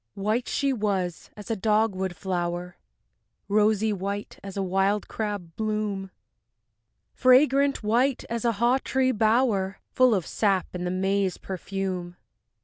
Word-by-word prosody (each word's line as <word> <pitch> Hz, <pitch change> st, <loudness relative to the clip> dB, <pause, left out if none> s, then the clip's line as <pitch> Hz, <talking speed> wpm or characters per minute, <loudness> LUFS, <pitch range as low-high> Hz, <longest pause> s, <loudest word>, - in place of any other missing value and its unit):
III 195 Hz, -, -5 dB
White 225 Hz, +4 st, 0 dB
she 275 Hz, -1 st, 0 dB
was 195 Hz, -7 st, -2 dB
as 210 Hz, +2 st, -7 dB
a -, -, +1 dB
dogwood 205 Hz, -3 st, +1 dB
flower, 175 Hz, -1 st, -3 dB, 0.7 s
Rosy 215 Hz, +1 st, +2 dB
white 200 Hz, +1 st, -5 dB
as 195 Hz, 0 st, -7 dB
a 195 Hz, -, 0 dB
wild 195 Hz, +2 st, +1 dB
crab 205 Hz, -6 st, -4 dB
bloom, 210 Hz, -3 st, -2 dB, 1.0 s
Fragrant 270 Hz, +1 st, +4 dB
white 240 Hz, +5 st, +1 dB
as 235 Hz, -1 st, -3 dB
a 235 Hz, -1 st, +2 dB
haw 240 Hz, +5 st, +2 dB
tree 260 Hz, -1 st, +1 dB
bower 215 Hz, -3 st, +2 dB
Full 255 Hz, -3 st, +4 dB
of 185 Hz, -4 st, -1 dB
sap 195 Hz, -4 st, +1 dB
and 180 Hz, 0 st, -3 dB
the -, -, -1 dB
May's 190 Hz, +1 st, 0 dB
perfume. 185 Hz, -2 st, -4 dB
205 Hz, 140 wpm, -26 LUFS, 190-225 Hz, 1.0 s, Fragrant